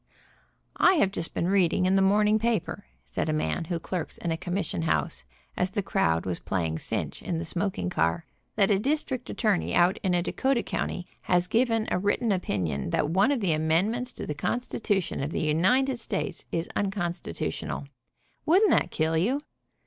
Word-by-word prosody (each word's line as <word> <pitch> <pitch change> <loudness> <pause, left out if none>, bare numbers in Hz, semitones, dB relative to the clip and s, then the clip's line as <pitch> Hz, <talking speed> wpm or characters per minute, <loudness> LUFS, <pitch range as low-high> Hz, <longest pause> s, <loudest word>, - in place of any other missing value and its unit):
"I 360 - +6
have 200 - +3
just 165 -4 -4
been 170 - 0
reading 185 -2 +3
in 185 +1 +3
the 195 - +4
morning 210 +2 +4
paper," 230 -4 -1 0.2
said 70 - -2
a - - +1
man 155 +2 -1
who 170 +1 -2
clerks 175 +1 -4
in 170 - -3
a - - +1
commission 175 - -2
house, 80 -5 0 0.3
as 180 - +1
the 205 +1 -2
crowd 80 - +1
was 90 -2 -2
playing 80 -4 -2
cinch - - -3
in 170 - -2
the 165 - -3
smoking 170 - -2
car, 80 - 0 0.3
"that 200 -1 +3
a 195 - +3
district 260 0 -1
attorney 210 -5 0
out 180 +3 +4
in 185 -2 +1
a 175 - +1
Dakota 265 +4 0
county, 180 - -3 0.2
has 180 -1 +2
given 225 +1 +1
a - - +2
written 205 +4 +1
opinion 90 - -1
that 145 - +1
one 195 +10 +4
of 270 -5 0
the 180 -5 +2
amendments 185 +11 +1
to - - -6
the 150 - -3
constitution 205 - -1
of 140 - -2
the - - -2
United 235 - +2
States 195 -5 -4
is 165 0 -1
unconstitutional. 195 -3 -3 0.6
Wouldn't 380 +6 +4
that - - +3
kill 160 0 0
you?" 225 - +2
185 Hz, 180 wpm, -27 LUFS, 160-215 Hz, 0.6 s, I